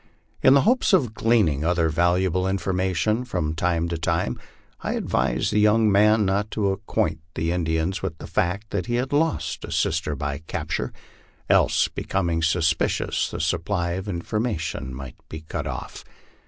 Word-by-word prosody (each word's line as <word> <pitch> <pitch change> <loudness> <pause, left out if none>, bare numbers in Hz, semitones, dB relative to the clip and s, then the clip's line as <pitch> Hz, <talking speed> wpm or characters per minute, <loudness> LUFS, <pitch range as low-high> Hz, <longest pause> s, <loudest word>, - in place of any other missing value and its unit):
In 130 - +6
the 140 - +6
hope 250 - +3
of 130 - +3
gleaning 105 -12 +2
other 85 -1 +2
valu 85 +3 +2
able 95 0 0
information 95 +3 0
from 80 -11 -2
time 85 0 0
to 85 -1 -3
time, 85 -5 -1 0.4
I - - -2
advised - - 0
the 105 - +3
young 105 +1 +4
man 105 +2 +4
not 100 +2 0
to 100 -2 +2
acquaint 95 -5 -1 0.2
the 80 +1 -1
Indians 85 +1 -1
with 90 -4 -4
the - - -9
fact 100 +5 -1
that 100 +1 -2
he 120 - 0
had 130 +3 -1
lost 160 +2 0
a - - -7
sister 80 -2 0
by 70 +1 -3
capture; - - -3 0.6
else, - - +4
becoming 85 -4 -1
suspicious, 80 -1 +1
the - - -6
supply 85 +2 -1
of 95 +3 -4
information 85 - -2
might 65 0 -8
be 80 - -7
cut 80 - -5
off. - - -6
90 Hz, 165 wpm, -24 LUFS, 80-105 Hz, 0.6 s, In